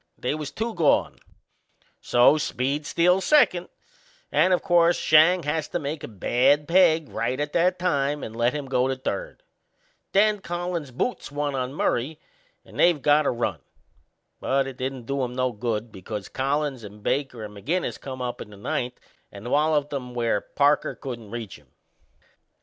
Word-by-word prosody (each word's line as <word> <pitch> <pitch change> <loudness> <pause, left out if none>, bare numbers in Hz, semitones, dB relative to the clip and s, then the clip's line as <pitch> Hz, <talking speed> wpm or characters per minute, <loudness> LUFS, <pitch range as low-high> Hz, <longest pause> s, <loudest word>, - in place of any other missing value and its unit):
They 125 - -2
was 150 -2 -4
two 225 +1 -3
gone; 165 -6 +2 0.8
so 125 +5 +4
Speed 145 +2 -2
steals 180 +3 +3
second, 220 - +3 0.6
and, 185 - +3
o' 180 - +5
course, 175 -1 +3
Schang 160 +3 +5
has 150 +1 -1
to - - -2
make 150 -1 -5
a - - -4
bad 130 +7 +2
peg 165 -4 +4
right 125 +3 -2
at 145 0 -3
that 180 +2 +2
time 145 -5 0
and 110 - -7
lets 120 +3 +1
him 145 -2 -3
go 130 -1 +1
to 135 - -1
third. - - -5 0.7
Then 210 +1 +3
Collins 175 -4 -4
boots 145 - -3
one 145 0 -2
on 130 +1 -3
Murray 145 +2 -1 0.5
and - - -12
they've 175 -3 +4
got 145 +1 +3
a - - +4
run. 115 - -2 0.8
But 135 0 +1
it 135 -2 -7
didn't 130 -2 -4
do 140 +1 -1
'em 125 0 -4
no 130 0 0
good, 115 0 -3
because 105 +1 -7
Collins 135 -1 -1
and 105 0 -11
Baker 135 -5 -1
and 105 -1 -9
McInnes 165 - -2
come 130 -2 -6
up 120 -1 -4
in - - -8
the 105 - -13
ninth 125 +5 -3 0.3
and 105 +5 -8
walloped 150 0 +2
'em 125 -3 -5
where 115 -4 0
Parker 145 +1 +1
couldn't 120 -6 -7
reach 115 -8 -7
'em. 75 - -26
140 Hz, 170 wpm, -25 LUFS, 120-160 Hz, 0.8 s, o